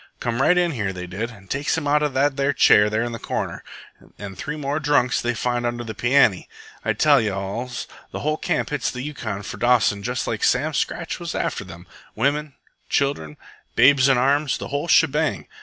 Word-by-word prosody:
"Come 120 +1 -2
right 180 +6 +4
in 175 -1 +2
here, 105 -8 -2
they 90 -1 -6
did, 100 +7 -4
an' 100 -5 -14
takes 140 - -1
him 160 - -3
out 150 +1 +3
of 150 -3 -1
that 135 +1 +2
there 140 +1 +1
chair 105 -5 +5
there 110 +2 0
in 120 - -3
the 115 - -6
corner, - - -4 0.5
an' 100 -2 -8
three 150 +10 -5
more 145 0 -2
drunks 145 -5 +2
they 120 0 -1
finds 120 +1 -1
under 120 0 -3
the 110 -1 -6
pianny. 120 -3 +2 0.3
I 110 - +1
tell 145 +4 +4
you 105 -3 -1
alls 115 +6 -4 0.2
the - - -6
whole 155 +1 0
camp 160 -3 -1
hits 145 -4 -1
up - - -7
the 125 - -4
Yukon 110 -9 -5
for - - -7
Dawson 120 -4 +2
jes' 125 +3 -2
like - - -3
Sam - - +2
Scratch - - -2
was - - -5
after - - -2
them, 85 +1 -12 0.3
wimmen, 145 0 -1 0.3
children, 80 - -1 0.4
babes 135 +2 +5
in 135 - +4
arms, 140 +3 +2
the - - -7
whole 145 +4 -2
shebang. 150 - +2
125 Hz, 210 wpm, -22 LUFS, 110-145 Hz, 0.5 s, chair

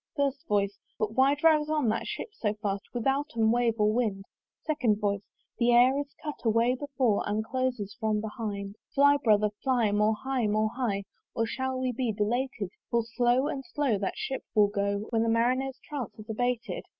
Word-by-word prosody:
FIRST 280 -2 -1
VOICE. 200 -1 0 0.2
"But 215 0 -1
why 265 +4 +4
drives 305 0 +3
on 305 -5 +1
that 225 +2 -1
ship 465 - -4
so 210 - -1
fast 200 -2 -2
"Withouten 270 -2 +1
wave 235 -1 +2
or 210 0 +3
wind?" 210 -5 -1 0.4
SECOND 245 -9 +1
VOICE. 200 -2 0 0.4
"The 240 0 +4
air 250 +3 +6
is 285 0 -6
cut 300 -2 -5
away 230 +2 +3
before, 260 -5 0
"And 215 +1 -1
closes 245 -5 -2
from 215 -1 +1
behind. 210 -2 -5 0.2
"Fly, 285 +1 +6
brother, 210 -2 +4
fly! 245 -5 +2
more 210 +1 +3
high, 260 0 -1
more 215 +1 +1
high, 215 -6 -1 0.3
"Or 230 - +1
we - - -1
shall 260 0 -2
be 240 -1 -1
belated: 225 -2 -1 0.2
"For 235 -1 +2
slow 240 +3 +2
and 275 -2 -3
slow 260 -4 0
that 195 - -3
ship 265 - -3
will 210 -1 +5
go, 200 0 -1
"When 225 -2 +2
the 230 - +1
Marinere's 255 +4 +1
trance 280 -7 -5
is 215 -1 -11
abated." 245 +1 -2
230 Hz, 185 wpm, -28 LUFS, 210-265 Hz, 0.4 s, air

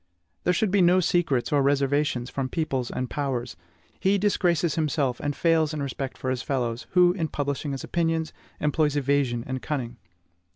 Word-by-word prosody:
There 180 - +3
should 195 +2 +1
be 200 -1 +4
no 180 +1 +5
secrets 165 -8 +1
or 145 -1 +3
reservations 140 -2 +1
from 135 -1 -2
peoples 135 -6 -2
and 130 0 -3
powers. 125 -4 -3 0.4
He 195 +1 +3
disgraces 175 -5 +1
himself 150 -5 0
and 145 -1 -2
fails 160 -2 +2
in 145 - -2
respect 135 0 -4
for 130 - -2
his 125 -2 -2
fellows, 120 -1 -2
who, 180 -1 +6
in 170 -4 -2
publishing 145 0 -3
his 135 - -4
opinions, 165 -2 -1 0.3
employs 150 0 +1
evasion 140 -4 +1
and 130 0 -4
cunning. 125 -6 -3
145 Hz, 170 wpm, -26 LUFS, 130-165 Hz, 0.4 s, who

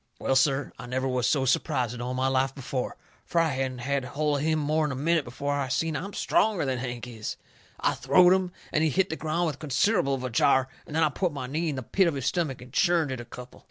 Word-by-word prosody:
Well, 135 - 0
sir, 135 +1 +2
I 120 - -8
never 130 +2 -1
was 125 -1 0
so 135 -3 +2
surprised 130 -2 +1
in 120 - -7
all 125 +1 -3
my 130 +1 +1
life 135 0 +1
before. 135 -1 -4 0.3
Fur 170 - -5
I 165 -1 +4
hadn't 130 -2 -2
had 140 +1 -1
holt 145 +3 -1
on - - -3
him 160 0 +2
more'n 155 0 +1
a - - -3
minute 160 +4 +1
before 140 +3 -3
I 140 -2 -1
seen 155 +5 -1
I'm 200 +5 -4
stronger 210 -7 +1
than 130 -2 -1
Hank 120 -1 -4
is. 110 -3 -6 0.4
I - - +2
throwed 175 +9 +5
him, 185 -1 0 0.2
and 155 - +3
he 160 - +3
hit 190 +4 +1
the - - -1
ground 160 +2 -1
with 150 -4 -3
considerable 155 - +1
of 130 - -6
a 130 - -3
jar, 130 +2 +3 0.2
and 150 - -7
then 160 - +3
I 155 - +4
put 175 +5 -1
my 140 -3 -4
knee 155 +6 -1
in 145 - -2
the 130 - -4
pit 190 - +2
of 165 - 0
his 135 -3 -4
stomach 150 -8 -1
and 125 0 -15
churned 170 -5 +2
it 130 - -4
a - - -10
couple. 125 +1 -11
140 Hz, 265 wpm, -27 LUFS, 130-160 Hz, 0.4 s, throwed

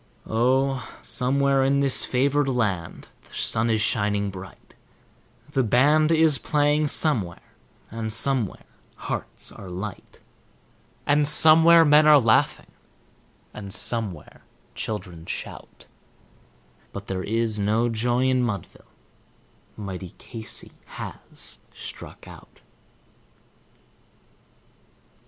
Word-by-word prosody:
Oh! 130 +2 0
somewhere 135 +1 +1
in 140 +1 +2
this 140 -2 +2
favored 140 +2 +1
land 105 -10 -3 0.2
the - - -16
sun 110 +1 0
is 110 -1 +1
shining 105 -2 0
bright; 95 0 -12 0.8
The 135 - +1
band 145 +7 +3
is 160 -3 +3
playing 150 0 +1
somewhere, 110 - 0 0.4
and 110 0 -4
somewhere 115 -1 0 0.3
hearts - - -6
are 95 - -11
light. 95 +3 -8 0.9
And 145 0 +3
somewhere 165 +2 +7
men 150 +1 +5
are 150 -1 +8
laughing, 115 -3 +1 0.8
and 100 -2 -8
somewhere 100 -9 -1 0.3
children 90 -6 -6
shout; - - -8 1.1
But 100 0 -7
there 95 -1 -4
is 110 0 0
no 110 +4 +1
joy 120 +2 0
in 130 -1 +2
Mudville 110 -5 -5 0.9
mighty 95 -3 -7
Casey 110 -2 -8
has - - -7 0.2
Struck - - -10
Out. - - -15
120 Hz, 100 wpm, -24 LUFS, 105-140 Hz, 1.1 s, are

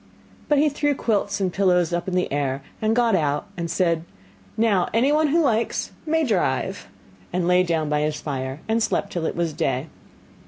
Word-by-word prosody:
But 295 - +4
he 300 +2 +4
threw 290 0 0
quilts 205 -4 0
and 185 -3 -1
pillows 180 -3 +2
up 175 +2 -2
in 185 - -2
the 180 - 0
air, 140 -1 -1 0.3
got 230 -2 +3
out 150 -1 0
and 170 -2 -4
said: 170 -1 +1 0.5
'Now 215 -5 +2
anyone 295 +6 +3
who 315 +4 +2
likes, 230 -4 0 0.2
may 320 +1 +2
drive,' 185 - -1 0.4
and 180 -1 0
lay 180 0 +5
down 165 -3 0
by 150 0 +1
his 150 0 -1
fire, 135 0 -4
and 225 +1 +1
slept 200 -2 0
till 165 -2 -1
it - - -3
was 170 -2 -1
day. 145 -2 -1
180 Hz, 185 wpm, -23 LUFS, 155-225 Hz, 0.5 s, lay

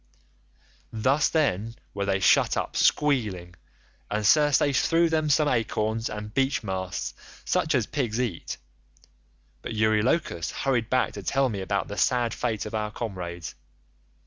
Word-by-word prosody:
"Thus 130 +7 +2
then 115 - 0 0.2
were 100 0 -3
they 100 0 +1
shut 95 - +4
up - - -3
squealing, 105 -12 +1 0.6
and 105 0 -1
Circe 145 +4 +5
threw 165 +4 +2
them 155 -1 +1
some 150 +1 +3
acorns 110 -2 0
and 105 0 -6
beech 135 -1 +1
masts 95 -2 -3 0.3
such 155 -1 +1
as 120 -5 +2
pigs 120 -4 -2
eat, 115 -9 -3 1.0
but - - -5
Eurylochus 110 - +1
hurried 125 -4 -1
back 130 0 +1
to - - -7
tell 135 -1 +1
me 100 -4 -4
about 100 -1 -1
the 100 - -7
sad 120 -2 +2
fate 110 -4 -2
of 105 - -7
our 105 -1 -1
comrades. 90 -6 -6
110 Hz, 145 wpm, -26 LUFS, 100-135 Hz, 1.0 s, Circe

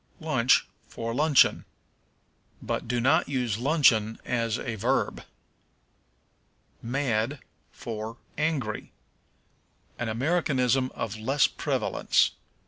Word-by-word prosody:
Lunch 135 -7 +3 0.2
for 115 0 -5
Luncheon. 145 +2 +4 1.0
But - - -3
do 120 +1 0
not 145 +8 +3
use 125 -6 -1
luncheon 120 -6 +3
as 115 -3 0
a 115 - -4
verb. 120 +5 0 1.6
Mad 125 0 -1 0.3
for 110 0 -6 0.2
Angry. 145 -9 -2 1.1
An 120 - -2
Americanism 130 -1 +1
of 110 0 -4
lessening 135 +6 +1
prevalence. - - +1
125 Hz, 90 wpm, -27 LUFS, 115-140 Hz, 1.6 s, Luncheon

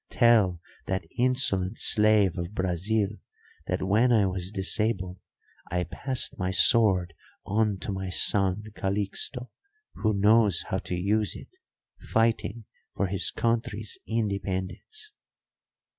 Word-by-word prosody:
Tell 110 -8 +3 0.3
that 95 -2 -2
insolent 120 -6 +1
slave 105 -4 +3
of 90 +2 -5
Brazil 95 +3 0 0.6
that - - -1
when 110 +6 +3
I 110 -4 +4
was 95 -1 -3
disabled 95 -1 -2 0.5
I 90 0 -1
passed 130 +9 -2
my 90 0 -1
sword 95 -3 +3 0.3
on 105 +1 +1
to - - -4
my 95 -1 -4
son 95 +1 +3
Calixto, 105 +6 -3 0.4
who 110 -2 0
knows 105 -2 +3
how 95 -2 -1
to 90 - -5
use 105 +4 0
it, - - -12 0.4
fighting 115 0 0 0.3
for - - 0
his 95 +1 -1
country's 115 -2 -2
independence.' 105 - -4
100 Hz, 115 wpm, -27 LUFS, 95-110 Hz, 0.6 s, I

